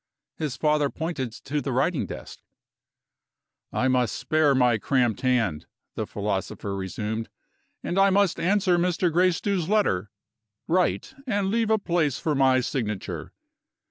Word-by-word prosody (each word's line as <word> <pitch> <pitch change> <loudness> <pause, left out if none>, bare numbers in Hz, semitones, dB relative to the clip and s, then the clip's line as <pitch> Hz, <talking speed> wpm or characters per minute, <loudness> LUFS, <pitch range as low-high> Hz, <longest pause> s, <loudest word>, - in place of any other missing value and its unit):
His 145 -4 -3
father 150 -2 +2
pointed 160 -7 -3
to 145 +5 -4
the 135 - -3
writing 140 +5 0
desk. - - -9 1.3
"I 130 - +1
must 125 -3 +1
spare 155 -3 +2
my 125 -3 +3
cramped 125 -1 +1
hand," 115 - 0 0.3
the - - -4
philosopher 100 -1 -3
resumed, 105 +4 -4 0.5
"and 185 - -1
I 195 0 +6
must 195 -1 +2
answer 185 -1 +2
Mr. 175 -1 +1
Gracedieu's 180 0 +1
letter. 105 - +1 0.6
Write, 180 +9 +1
and 200 -4 0
leave 225 0 +1
a 220 - +4
place 170 - 0
for 155 - -1
my 130 -2 +4
signature." 110 -6 -4
150 Hz, 135 wpm, -25 LUFS, 125-180 Hz, 1.3 s, I